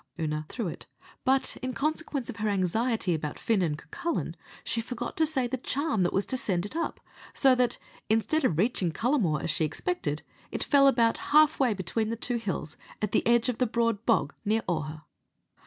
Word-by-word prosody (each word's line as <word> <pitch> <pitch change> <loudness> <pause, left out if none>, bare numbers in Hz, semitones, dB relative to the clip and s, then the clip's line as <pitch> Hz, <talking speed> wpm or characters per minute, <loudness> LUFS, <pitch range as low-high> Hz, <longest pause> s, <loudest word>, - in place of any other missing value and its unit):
Oonagh 155 -1 -2
threw 230 -6 -3
it; 165 - -7 0.4
but, 265 0 +2
in 255 0 -3
consequence 300 -3 -1
of 245 - -5
her 215 -1 0
anxiety 200 +1 +1
about 150 -2 -3
Fin 220 -4 +1
and 155 -4 0
Cucullin, 340 - -3 0.3
she 230 - 0
forgot 240 +1 -5
to 320 0 +3
say 270 -5 0
the 255 +2 -2
charm 280 -2 -1
that 175 - +2
was 195 - +1
to 260 - -1
send 185 -6 0
it 205 - -6
up, 335 - -2 0.4
so 270 -2 +5
that, 250 -1 +2 0.3
instead 225 +8 +2
of 170 -12 +2
reaching 190 -3 +1
Cullamore, 210 - +1
as - - +1
she 155 - 0
expected, 355 - -2 0.3
it - - -2
fell 280 -1 +5
about 235 -4 +3
half 305 +1 +5
way 250 -6 +3
between 200 +4 -1
the 230 - -1
two 240 +1 -1
hills, 190 -8 -4 0.2
at 210 -1 -1
the - - +3
edge 235 0 +4
of 245 -2 -1
the 250 - +3
Broad 230 -2 0
Bog 230 - +2
near 220 +1 +1
Augher. 155 -2 -3
230 Hz, 200 wpm, -28 LUFS, 185-260 Hz, 0.4 s, so